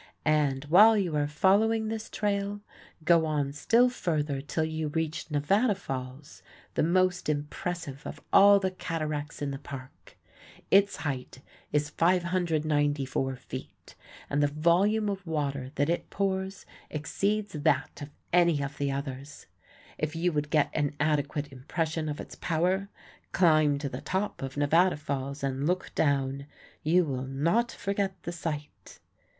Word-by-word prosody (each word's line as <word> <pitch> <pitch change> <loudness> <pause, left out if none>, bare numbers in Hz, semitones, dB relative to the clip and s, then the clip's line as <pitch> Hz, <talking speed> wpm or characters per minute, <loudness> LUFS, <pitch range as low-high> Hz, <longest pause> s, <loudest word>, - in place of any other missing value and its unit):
And, 145 -3 +2
while 205 +9 +7
you 180 -6 0
are 145 -1 +1
following 215 +8 +3
this 220 0 -4
trail, 205 -1 -1 0.4
go 165 0 +5
on 145 -2 -1
still 230 - +4
further 150 - -1
till 155 +3 -2
you 160 0 -2
reach 160 +2 -3
Nevada 195 - +2
Falls, 135 -3 -7 0.3
the - - +1
most 180 +1 +2
impressive 150 0 -3
of - - -7
all 200 0 +8
the 190 -1 -1
cataracts 155 -5 -4
in 140 - -2
the 135 - -5
Park. 135 -2 -11 0.5
Its 200 +1 +5
height 135 -3 -5 0.3
is 150 0 0
594 155 -6 +1
feet, - - -10 0.3
and 145 +1 0
the 145 - +4
volume 175 +9 +2
of 195 -3 -4
water 140 -4 -2
that 145 +1 +1
it 170 +1 -1
pours 190 -1 -2 0.2
exceeds 200 +8 -1
that 145 -2 0
of 145 - -6 0.2
any 170 -4 +4
of 140 +1 -6
the 140 -1 0
others. 135 +1 -6 0.5
If 155 +1 -2
you 175 +2 +1
would 150 -1 -2
get 150 -2 +2
an 145 -1 -1
adequate 150 -1 0
impression 155 +4 -3
of 150 - -4
its - - -8
power, 180 +4 0 0.4
climb 155 -5 +4
to 140 0 -3
the - - -6
top 190 +3 -2
of 135 +1 -5
Nevada 165 +5 +3
Falls 140 -1 -4
and 135 +1 -1
look 180 +1 -1
down. 140 -1 0 0.3
You 175 +3 +3
will 130 -3 -3
not 170 - +1
forget 195 -1 -2
the 170 - -4
sight. 160 -3 -6
155 Hz, 145 wpm, -28 LUFS, 145-185 Hz, 0.5 s, all